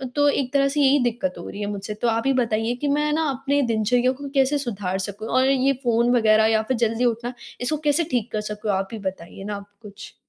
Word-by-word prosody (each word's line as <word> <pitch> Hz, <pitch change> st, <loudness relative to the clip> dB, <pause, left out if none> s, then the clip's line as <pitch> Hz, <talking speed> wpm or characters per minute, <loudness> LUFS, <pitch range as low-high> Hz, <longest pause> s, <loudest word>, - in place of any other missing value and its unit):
तो 290 Hz, 0 st, +4 dB
एक 270 Hz, -3 st, -1 dB
तरह 275 Hz, -1 st, +4 dB
से 290 Hz, +2 st, 0 dB
यही 280 Hz, +1 st, +5 dB
दिक़्क़त 245 Hz, +3 st, -1 dB
हो -, -, -8 dB
रही 200 Hz, -, -8 dB
है 205 Hz, -, -2 dB
मुझसे 205 Hz, +1 st, -5 dB
तो 240 Hz, -, +2 dB
आप 225 Hz, 0 st, +1 dB
ही 270 Hz, -, +3 dB
बताइए 230 Hz, -2 st, 0 dB
कि 295 Hz, -, 0 dB
मैं 295 Hz, +1 st, +1 dB
ना 320 Hz, +1 st, +1 dB
अपने 275 Hz, +2 st, 0 dB
दिनचर्या 240 Hz, +1 st, +2 dB
को 280 Hz, +2 st, -7 dB
कैसे 270 Hz, +2 st, +3 dB
सुधार 205 Hz, -8 st, -3 dB
सकूँ 205 Hz, +3 st, -5 dB
और 260 Hz, +3 st, +2 dB
ये 270 Hz, 0 st, +3 dB
फ़ोन 235 Hz, 0 st, +2 dB
वग़ैरह 220 Hz, -2 st, +4 dB
या 220 Hz, -, +3 dB
फ़िर 255 Hz, +3 st, -1 dB
जल्दी 230 Hz, +3 st, -1 dB
उठना 240 Hz, +1 st, -1 dB, 0.3 s
इसको 275 Hz, +5 st, 0 dB
कैसे 295 Hz, +3 st, +3 dB
ठीक 245 Hz, -2 st, -1 dB
कर 215 Hz, -, -1 dB
सकूँ 210 Hz, 0 st, -2 dB
आप 195 Hz, 0 st, -1 dB
ही 225 Hz, -, -5 dB
बताइए 190 Hz, -1 st, -6 dB
ना 205 Hz, +1 st, -4 dB
आप 200 Hz, 0 st, -9 dB
कुछ। 205 Hz, -2 st, -11 dB
240 Hz, 245 wpm, -23 LUFS, 215-275 Hz, 0.3 s, यही